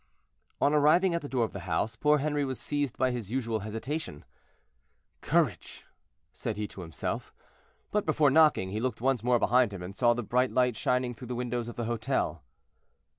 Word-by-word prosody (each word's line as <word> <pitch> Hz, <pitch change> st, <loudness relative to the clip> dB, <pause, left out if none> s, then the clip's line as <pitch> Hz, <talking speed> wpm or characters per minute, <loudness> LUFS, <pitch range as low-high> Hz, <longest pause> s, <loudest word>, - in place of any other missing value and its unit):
On 145 Hz, -, +3 dB
arriving 155 Hz, +5 st, +4 dB
at 170 Hz, -, -1 dB
the 145 Hz, -, -7 dB
door 125 Hz, -3 st, +1 dB
of -, -, -8 dB
the -, -, -5 dB
house, 110 Hz, +7 st, 0 dB
poor 150 Hz, +6 st, +3 dB
Henri 145 Hz, 0 st, 0 dB
was 130 Hz, -2 st, -3 dB
seized 145 Hz, -3 st, -2 dB
by 130 Hz, -1 st, +2 dB
his 120 Hz, -5 st, -5 dB
usual 115 Hz, -3 st, -1 dB
hesitation. 110 Hz, -, -5 dB, 1.0 s
"Courage!" -, -, 0 dB, 0.5 s
said 110 Hz, -4 st, -4 dB
he 105 Hz, 0 st, -2 dB
to 95 Hz, -, -9 dB
himself. 80 Hz, -3 st, -4 dB, 0.6 s
But 210 Hz, -4 st, 0 dB
before 150 Hz, -2 st, +3 dB
knocking, 150 Hz, -11 st, +4 dB
he 105 Hz, -, -2 dB
looked 125 Hz, -1 st, -2 dB
once 130 Hz, -2 st, +1 dB
more 125 Hz, 0 st, +3 dB
behind 125 Hz, -1 st, +3 dB
him, 95 Hz, -3 st, -7 dB
and 95 Hz, +2 st, -8 dB
saw 120 Hz, 0 st, +3 dB
the 120 Hz, -, -3 dB
bright 125 Hz, +4 st, +1 dB
light 125 Hz, -2 st, +2 dB
shining 125 Hz, +2 st, 0 dB
through 125 Hz, +1 st, -10 dB
the 125 Hz, -, -4 dB
windows 120 Hz, -1 st, -2 dB
of 120 Hz, -, -7 dB
the 120 Hz, -, -3 dB
hotel. 115 Hz, -1 st, -1 dB
125 Hz, 190 wpm, -29 LUFS, 110-145 Hz, 1.0 s, arriving